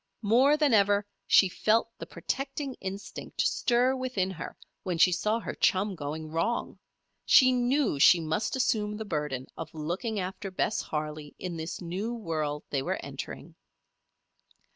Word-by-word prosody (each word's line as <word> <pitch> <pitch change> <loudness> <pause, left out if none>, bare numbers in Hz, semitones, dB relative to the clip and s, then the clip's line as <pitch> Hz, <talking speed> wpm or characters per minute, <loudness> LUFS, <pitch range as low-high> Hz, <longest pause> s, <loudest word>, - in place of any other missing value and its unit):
More 255 +8 +5
than 295 -5 +3
ever 205 -1 +4 0.2
she 195 - +6
felt 215 +5 +2
the - - -7
protecting 275 0 -4
instinct 195 +1 -5
stir 250 +1 +2
within 250 -8 -1
her 170 - -7 0.2
when 180 -3 -2
she 180 +2 +6
saw 210 +5 +1
her - - -5
chum 195 +2 +2
going 155 -1 -5
wrong. 165 +9 -1 0.4
She 255 -1 +6
knew 250 - +1
she 170 +5 +7
must 160 +9 -1
assume 210 -5 0
the 220 - -5
burden 150 -7 -3
of 160 0 -8
looking 180 +8 -3
after 190 +2 -4
Bess 190 +3 0
Harley 150 -1 -5
in 180 -2 -5
this 160 +1 -5
new 195 +8 -3
world 155 -8 -3
they 140 - 0
were - - -2
entering. - - -7
195 Hz, 150 wpm, -28 LUFS, 160-230 Hz, 0.4 s, she